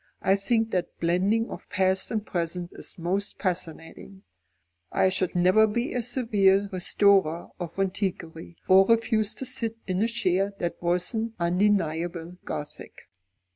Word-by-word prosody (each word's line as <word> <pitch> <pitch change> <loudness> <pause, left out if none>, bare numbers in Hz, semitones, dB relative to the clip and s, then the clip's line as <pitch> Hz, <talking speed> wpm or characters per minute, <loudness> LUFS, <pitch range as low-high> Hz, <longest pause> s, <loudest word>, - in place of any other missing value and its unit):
I 190 - +4
think 225 +3 0
that 180 -2 -3
blending 190 +7 +1
of - - -9
past 190 -1 +1
and 215 -2 -2
present 175 -1 -3
is - - -8
most 190 +4 -2
fascinating. 180 +1 -4 0.7
I 190 - +3
should 185 -1 -1
never 185 +5 +5
be 235 +4 -2
a 250 - 0
severe 210 -5 +2
restorer 185 -2 +2
of 175 0 -6
antiquity, 185 -4 -3
or 190 +1 +6
refuse 225 -2 +2
to 265 - -4
sit 230 -3 -3
in 185 +1 -1
a 225 - +3
chair 200 -4 0
that 175 -1 -4
wasn't 200 +6 -1
undeniably 175 -2 0
Gothic." 150 - -7
190 Hz, 135 wpm, -26 LUFS, 175-215 Hz, 0.7 s, or